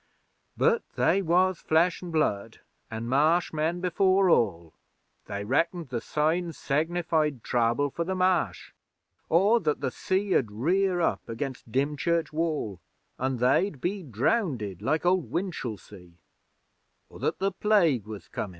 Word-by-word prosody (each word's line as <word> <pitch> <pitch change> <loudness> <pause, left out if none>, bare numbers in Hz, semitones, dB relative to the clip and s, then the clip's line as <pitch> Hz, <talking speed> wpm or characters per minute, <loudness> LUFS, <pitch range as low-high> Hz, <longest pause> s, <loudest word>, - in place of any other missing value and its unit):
But 470 0 +3
they 195 - +2
was 185 +1 +2
Flesh 165 +3 +2
an' 180 - -7
Blood, 115 -9 -1 0.3
an' 115 +1 -5
Marsh 155 +8 +2
men 160 +3 -1
before 185 +1 +3
all. 85 - +1 0.5
They 100 0 -4
reckoned 165 - 0
the 120 -2 -3
signs 160 +2 -1
sinnified 155 -2 0
trouble 120 +4 +1
for 170 - -2
the 190 +2 -3
Marsh. 180 - 0 0.6
Or 200 +8 +4
that 150 -8 -1
the 130 -2 -1
sea 190 +6 -1
'ud 115 - +2
rear 175 - +1
up - - -1
against 120 0 -5
Dymchurch 150 +5 0
Wall 155 - -2 0.4
an' 130 0 -1
they'd 135 - +2
be 195 +7 -2
drownded 125 - -1
like 155 +9 0
Old 180 -8 +2
Winchelsea; 110 - -5 0.9
or - - -14
that - - -1
the 195 +2 0
Plague 175 - +2
was 110 -2 -8
comin'. 105 - -5
155 Hz, 140 wpm, -27 LUFS, 120-180 Hz, 0.9 s, Or